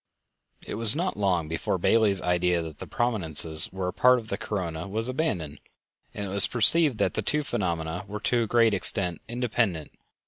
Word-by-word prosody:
It - - -7
was 115 +1 +10
not 180 +4 -2
long 90 -6 -1
before 80 +3 -3
Bailey's 100 0 +1
idea 90 -1 0
that 80 -3 -10
the - - -9
prominences 80 -9 0
were 95 -1 -4
a - - -7
part 125 +4 +4
of 110 -2 -8
the - - -2
corona 85 -4 -5
was 110 +4 -2
abandoned, 110 - -3 0.5
and 105 - -6
it - - -6
was 100 0 +7
perceived 135 +3 +3
that - - -1
the - - -3
two 150 0 -1
phenomena 85 - -4
were 105 +2 -6
to 120 +1 0
a 115 - -2
great 115 -1 +2
extent 90 -3 -1
independent. 115 -9 -2
100 Hz, 185 wpm, -25 LUFS, 85-120 Hz, 0.5 s, was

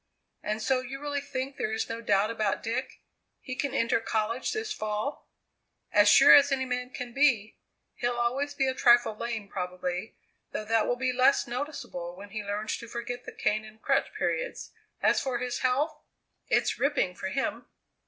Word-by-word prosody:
"And 215 +1 -3
so 265 -1 +2
you 260 +2 -7
really 285 -1 -2
think 270 -1 -4
there 215 - -1
is 220 - -1
no 230 0 -5
doubt 205 -1 +2
about 215 -3 -1
Dick? 255 +3 -3 0.4
He 255 - -6
can 280 0 -2
enter 230 0 +2
college 225 +2 -1
this 435 0 -2
fall?" 215 - -3 0.6
"As 205 -1 +6
sure 275 +5 +9
as 285 0 +7
any 265 -1 +1
man 250 0 -3
can 250 -2 -7
be. 245 -6 +2 0.3
He'll 240 0 -1
always 270 +5 0
be 270 -2 +1
a 260 - +1
trifle 240 -3 +5
lame 225 -2 -4
probably, 180 +1 -4 0.4
though 215 - -3
that 225 0 +2
will 245 - +1
be 255 0 0
less 255 +2 +4
noticeable 245 - -5
when 200 +2 -11
he 215 0 -4
learns 205 +1 -2
to 230 - -9
forget 240 +1 -5
the - - -7
cane 215 0 0
and 220 0 -14
crutch - - +1
periods; - - -2 0.3
as - - +4
for 260 -3 -1
his 245 0 -3
health 290 +4 +1 0.5
it's - - +1
ripping, 280 -11 +1
for 190 - -5
him!" 270 +7 -2
240 Hz, 185 wpm, -28 LUFS, 215-265 Hz, 0.6 s, sure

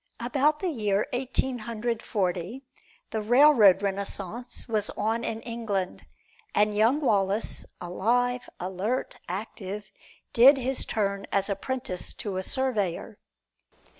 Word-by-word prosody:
About 280 +5 +1
the 375 - 0
year 210 -6 +1
Eighteen 255 0 0
Hundred 230 +1 -3
Forty, 190 +5 -2 0.5
the 220 - -1
railroad 225 -5 +6
renaissance 200 +4 -4
was 215 -3 -1
on 225 +2 0
in 225 0 -2
England, 220 -6 -3 0.5
and 210 0 +3
young 225 +7 +3
Wallace, 205 -4 0
alive, 245 +8 0
alert, 190 +7 -2
active, 205 +1 -5 0.4
did 265 +4 +8
his 265 +1 -1
turn 200 -2 -1
as 200 +1 +1
apprentice 250 -1 -3
to 200 -3 -4
a - - 0
surveyor. 210 -6 -1
220 Hz, 115 wpm, -27 LUFS, 195-245 Hz, 0.5 s, did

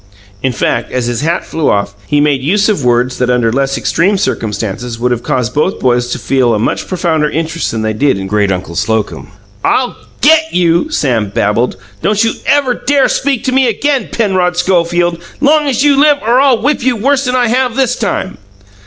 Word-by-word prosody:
In 130 - 0
fact, 115 0 -2
as 125 -2 -1
his 120 -1 -2
hat 165 +3 -1
flew 160 -2 -1
off, 100 0 0
he 145 - +1
made 145 -2 +2
use 200 +9 +1
of 200 -10 0
words 125 +1 +1
that 125 0 0
under 120 -2 +1
less 135 +1 0
extreme 195 +4 +1
circumstances 115 - -3
would 125 +1 0
have 120 -1 -1
caused 120 -4 -2
both 155 +6 0
boys 120 -1 +1
to - - -2
feel 125 -4 +1
a - - 0
much 105 - -2
profounder 165 -5 0
interest 165 +1 -2
than 110 -1 -3
they 110 0 -1
did 135 +1 +1
in 95 - -5
great 100 0 0
uncle 90 -2 -4
Slocum. 110 +4 -2 0.4
"I'll 255 -1 +1 0.3
GET 320 +2 +3
you!" 170 - +2
Sam 120 - 0
babbled. 105 +5 0 0.2
"Don't 210 +1 +1
you 225 - +1
ever 280 -3 +2
dare 280 +2 +1
to - - +2
speak 270 -4 -1
to 260 - -1
me 260 0 +3
again, 270 +4 -1
Penrod 185 -5 0
Schofield, 175 -1 +1 0.2
long 300 +1 +3
as 260 -1 +1
you 290 -1 +4
live, 295 0 +5
or 240 +3 +3
I'll 265 -5 +3
whip 290 +5 0
you 250 0 +1
worse'n 265 +2 +1
I 245 -2 +2
have 250 0 0
this 260 -2 +1
time!" 195 -3 -3
170 Hz, 205 wpm, -13 LUFS, -, 0.4 s, live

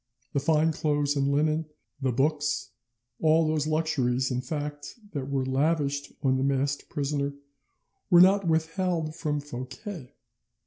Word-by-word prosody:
The - - +2
fine 155 +2 +3
clothes 145 -2 0
and 140 0 +1
linen, 155 +2 +1 0.3
the 130 -1 +1
books, 145 +1 0 0.5
all 160 +1 +4
those 155 -1 0
luxuries 130 -5 +1
in 125 0 -1
fact 145 +2 -5 0.2
that 140 -3 -4
were 135 -2 0
lavished 140 +1 0
on 130 -1 +3
the 130 - 0
masked 140 +1 0
prisoner, 140 0 -2 0.7
were 175 -3 +7
not 190 +1 +6
withheld 165 0 0
from 150 -3 -1
Fouquet. 140 - -8
145 Hz, 135 wpm, -27 LUFS, 140-160 Hz, 0.7 s, were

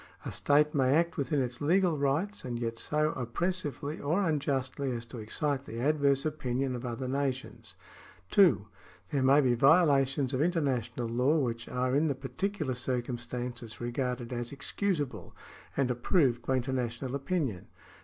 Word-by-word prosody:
A - - -3
state 150 +1 +3
may 135 -1 +3
act 170 +1 +2
within 145 -2 0
its 125 +1 -5
legal 175 +3 +3
rights, 150 +9 -1
and 120 -2 -3
yet 115 -1 -3
so 150 0 +1
oppressively 145 +3 -3
or 160 +7 0
unjustly 140 -6 0
as 120 -2 -3
to 115 +1 -9
excite 140 +5 -2
the 115 -2 -6
adverse 140 0 +2
opinion 135 -4 -1
of 120 - -6
other 120 +2 -4
nations. 135 0 -3 0.6
(2) 170 - +5 0.5
There 140 - +1
may 135 +3 +6
be 125 -3 +3
violations 140 -1 +4
of 130 - +1
international 130 - 0
law 125 +7 +2
which 115 -5 -2
are 125 +1 0
in 155 +3 +3
the 140 - 0
particular 140 +3 -3
circumstances 120 -1 -4
regarded 120 0 -3
as 120 -1 -4
excusable, 145 0 -3 0.4
and 135 -2 +2
approved 125 -1 +2
by 130 - +2
international 125 0 -2
opinion. 140 - -2
135 Hz, 150 wpm, -30 LUFS, 125-150 Hz, 0.6 s, may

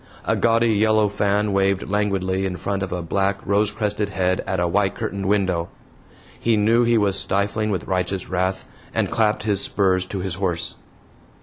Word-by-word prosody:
A - - +1
gaudy 115 0 +2
yellow 110 0 +3
fan 105 +1 0
waved 95 0 +1
languidly 95 -2 0
in 90 - -4
front 100 +3 -3
of 95 - -3
a 90 -1 -3
black 100 +3 0
rose 100 +2 +2
crested 105 -1 -2
head 95 -1 0
at 95 - -1
a 90 - +1
white 95 +2 +1
curtained 100 -1 -3
window. 95 -4 0 0.7
He 115 -2 +2
knew 115 +3 +3
he 120 0 +3
was 100 -3 +2
stifling 100 +3 0
with 95 -5 -2
righteous 95 0 -2
wrath, 95 +1 -2 0.3
and - - 0
clapped 110 -2 +1
his 105 -3 +1
spurs 95 -2 +1
to 100 - -5
his 95 -2 -3
horse. 90 -2 -1
100 Hz, 180 wpm, -22 LUFS, 95-105 Hz, 0.7 s, yellow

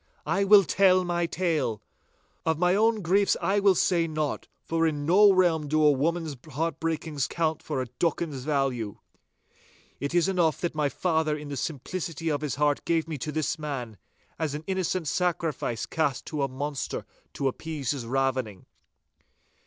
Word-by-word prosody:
'I 195 +1 +1
will 200 0 +8
tell 185 +4 +4
my 175 -1 0
tale. 155 - -1 0.6
Of 160 -1 +1
my 180 +2 +3
own 220 +1 +2
griefs 195 +4 +3
I 200 +1 +1
will 200 -2 +4
say 170 -1 +2
naught, 155 -2 -3 0.2
for 165 0 +1
in 145 -2 -2
no 200 +5 +6
realm 175 -5 +2
do 155 +1 +2
a 150 - +7
woman's 160 +2 -1 0.2
heart 165 +5 -2
breakings 160 -3 -2
count 160 -2 -1
for 135 -4 -2
a - - -6
docken's 145 +2 -2
value. 135 -7 -1 1.0
It 140 +5 -3
is 175 +1 +4
enough 175 -5 +1
that 175 - -1
my 150 -2 0
father 160 -2 0
in 150 -1 -8
the 140 - -4
simplicity 165 +3 -4
of 145 - -1
his 150 -4 -2
heart 145 0 +1
gave 165 -1 0
me 155 -3 -5
to 150 - -3
this 155 +1 -1
man, 125 -8 -5 0.4
as 155 -3 -1
an 150 - -6
innocent 185 -2 -1
sacrifice 165 -8 -1
is - - -2
cast 145 -5 -1
to 150 -2 -3
a 140 - +2
monster 140 +2 -4 0.3
to 140 - -1
appease 145 -1 -3
his 130 -5 -4
ravening. 130 -6 -1
155 Hz, 175 wpm, -27 LUFS, 140-175 Hz, 1.0 s, will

